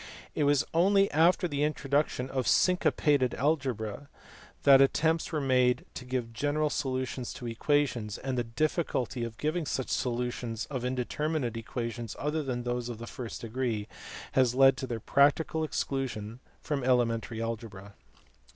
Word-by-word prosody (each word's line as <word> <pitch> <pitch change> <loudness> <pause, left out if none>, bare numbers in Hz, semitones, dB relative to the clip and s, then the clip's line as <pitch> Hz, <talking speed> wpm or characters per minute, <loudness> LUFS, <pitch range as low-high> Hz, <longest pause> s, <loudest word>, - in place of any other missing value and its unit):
It 150 - +1
was 145 0 +3
only 195 +4 +4
after 170 +4 +4
the 145 -3 -2
introduction 145 -3 0
of 130 -2 -1
syncopated 150 -7 +3
algebra 130 -3 -1 0.5
that 135 -1 +8
attempts 160 +5 +2
were 155 - 0
made 125 -2 +2
to 125 - -7
give 125 -2 -3
general 145 +5 0
solutions 130 -3 -3
of 120 - -6
equations, 120 -3 0
and 130 -1 -3
the 120 - 0
.difficulty 130 -1 -1
of 115 -1 -6
giving 155 +1 -1
such 130 - -2
solu 125 0 -1
tions 115 -2 -4
of 130 -3 -3
indeterminate 130 +1 -1
equations 115 0 -5
other 150 +2 -1
than 125 -4 -3
those 120 0 -2
of 120 - -5
the 115 - -7
first 120 -1 -7
degree 115 -2 -2 0.4
has 125 -2 +3
led 135 0 +6
to 130 - -4
their 115 -2 -3
practical 145 +6 +2
exclusion 125 -6 -3 0.2
from 145 -3 -2
elementary 115 -3 +1
algebra. 110 -4 -5
130 Hz, 150 wpm, -29 LUFS, 120-145 Hz, 0.5 s, that